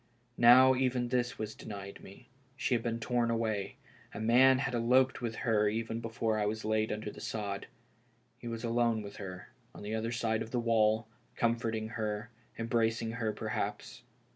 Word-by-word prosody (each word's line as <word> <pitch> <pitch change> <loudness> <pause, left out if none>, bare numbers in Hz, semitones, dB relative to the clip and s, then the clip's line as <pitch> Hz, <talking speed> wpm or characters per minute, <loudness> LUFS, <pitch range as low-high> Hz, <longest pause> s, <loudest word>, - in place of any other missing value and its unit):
Now 130 +2 +8
even 125 -1 0
this 125 -1 0
was 110 0 -4
denied 100 -2 -8
me; 105 +5 -14 0.3
she 135 -1 -1
had 120 - +2
been 115 0 -2
torn 120 0 0
away, 110 -4 -1 0.4
a - - -4
man 125 +4 +5
had 135 -1 -2
eloped 125 +3 +3
with 115 -2 -3
her 105 -3 +3
even 115 +1 -3
before 115 -1 -1
I 105 - +1
was 110 +1 -3
laid 110 0 +1
under 105 0 -4
tlie - - -11
sod. 100 -2 -4 0.7
He 120 - -8
was 115 0 -5
alone 115 -2 +1
with 100 0 -9
her, 95 -2 -8 0.3
on - - -9
the 105 +1 -4
other 110 +1 -2
side 115 -2 0
of 110 - -5
the 120 - -1
wall, 110 -1 +2 0.3
comforting 115 -2 0
her 110 0 -3
— - - -30
em 115 - -3
bracing 115 -1 0
her, 115 -2 -1
perhaps! - - -4
115 Hz, 185 wpm, -32 LUFS, 110-120 Hz, 0.7 s, Now